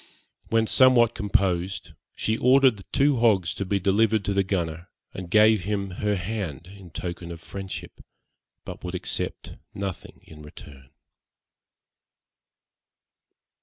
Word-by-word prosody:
When 115 Hz, 0 st, +2 dB
somewhat 120 Hz, -1 st, +5 dB
composed, 95 Hz, -3 st, -1 dB, 0.2 s
she 110 Hz, -, -1 dB
ordered 130 Hz, -1 st, +4 dB
the 100 Hz, -, -12 dB
two 140 Hz, -1 st, +3 dB
hogs 100 Hz, -8 st, +2 dB
to 100 Hz, -, -4 dB
be 100 Hz, +1 st, 0 dB
delivered 105 Hz, +2 st, +2 dB
to 100 Hz, -, 0 dB
the 100 Hz, -, +2 dB
gunner, 85 Hz, -3 st, -3 dB, 0.2 s
and 90 Hz, -2 st, -7 dB
gave 105 Hz, 0 st, +4 dB
him 100 Hz, -2 st, -2 dB
her 105 Hz, +3 st, -1 dB
hand 90 Hz, -5 st, -4 dB
in 95 Hz, -1 st, -13 dB
token 85 Hz, +1 st, -6 dB
of 85 Hz, -, -8 dB
friendship, 95 Hz, +2 st, -8 dB, 0.6 s
but -, -, -9 dB
would -, -, -5 dB
accept -, -, -4 dB, 0.2 s
nothing 100 Hz, -3 st, -6 dB
in 75 Hz, -1 st, -14 dB
return. 70 Hz, -3 st, -13 dB
100 Hz, 130 wpm, -25 LUFS, 90-110 Hz, 0.6 s, somewhat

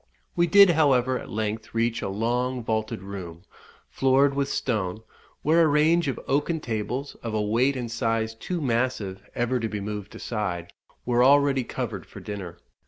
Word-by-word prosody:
We 175 Hz, 0 st, +3 dB
did, 200 Hz, +1 st, +8 dB
however, 130 Hz, -5 st, +3 dB
at -, -, -10 dB
length 110 Hz, +1 st, -4 dB
reach 115 Hz, +1 st, +1 dB
a -, -, -3 dB
long 120 Hz, +4 st, -1 dB
vaulted 110 Hz, -3 st, -2 dB
room, 90 Hz, -4 st, -8 dB, 0.4 s
floored 135 Hz, +1 st, +3 dB
with 140 Hz, 0 st, -1 dB
stone, 105 Hz, -4 st, -2 dB, 0.4 s
where 160 Hz, +3 st, +4 dB
a 165 Hz, -, +5 dB
range 155 Hz, +3 st, +3 dB
of 135 Hz, -, -2 dB
oaken 150 Hz, +4 st, +1 dB
tables, 125 Hz, +3 st, -3 dB
of 115 Hz, -2 st, -4 dB
a 105 Hz, -, +1 dB
weight 120 Hz, +6 st, +2 dB
and 120 Hz, -3 st, -4 dB
size 115 Hz, -1 st, -1 dB
too 170 Hz, +9 st, -4 dB
massive 115 Hz, -7 st, -1 dB
ever 120 Hz, +1 st, 0 dB
to 115 Hz, -1 st, -2 dB
be 105 Hz, -, -4 dB
moved 105 Hz, 0 st, -6 dB
aside, 90 Hz, -7 st, -4 dB, 0.3 s
were 120 Hz, 0 st, +3 dB
already 140 Hz, -1 st, +4 dB
covered 115 Hz, -5 st, -5 dB
for -, -, -11 dB
dinner. 95 Hz, -5 st, -7 dB
120 Hz, 170 wpm, -25 LUFS, 105-135 Hz, 0.4 s, did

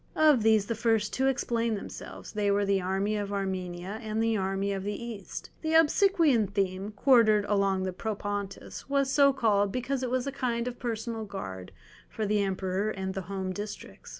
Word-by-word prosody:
Of 305 Hz, -6 st, +5 dB
these 220 Hz, -2 st, +4 dB
the 230 Hz, -, -2 dB
first 225 Hz, -2 st, +1 dB
two 265 Hz, +1 st, +1 dB
explain 235 Hz, -4 st, 0 dB
themselves, 200 Hz, -, -8 dB
they 210 Hz, -1 st, 0 dB
were 200 Hz, 0 st, +2 dB
the 195 Hz, -1 st, +2 dB
"army 195 Hz, +3 st, 0 dB
of 205 Hz, -1 st, -3 dB
Armenia" 190 Hz, 0 st, -3 dB
and 220 Hz, 0 st, -3 dB
the 225 Hz, 0 st, +2 dB
"army 195 Hz, 0 st, -1 dB
of 195 Hz, -1 st, -4 dB
the 205 Hz, +1 st, -2 dB
East"; 230 Hz, -5 st, -7 dB
the 320 Hz, 0 st, 0 dB
Obsequian 320 Hz, -, +4 dB
theme, 195 Hz, 0 st, -2 dB
quartered 215 Hz, -3 st, +4 dB
along 195 Hz, -2 st, +1 dB
the 185 Hz, -1 st, -2 dB
Propontis, 205 Hz, +2 st, -5 dB
was 275 Hz, -1 st, +1 dB
so 280 Hz, 0 st, +6 dB
called 210 Hz, -7 st, +2 dB
because 255 Hz, +3 st, -2 dB
it 255 Hz, -, -2 dB
was 255 Hz, 0 st, 0 dB
a 275 Hz, -, -2 dB
kind 245 Hz, -3 st, -1 dB
of 245 Hz, -1 st, -5 dB
personal 225 Hz, -1 st, -3 dB
guard 95 Hz, -, -7 dB, 0.4 s
for 220 Hz, -, -3 dB
the 210 Hz, 0 st, +2 dB
Emperor 190 Hz, +1 st, -1 dB
and 190 Hz, -2 st, -3 dB
the 195 Hz, -, -3 dB
home 190 Hz, -1 st, -3 dB
districts. 205 Hz, +1 st, -8 dB
210 Hz, 185 wpm, -29 LUFS, 195-240 Hz, 0.4 s, so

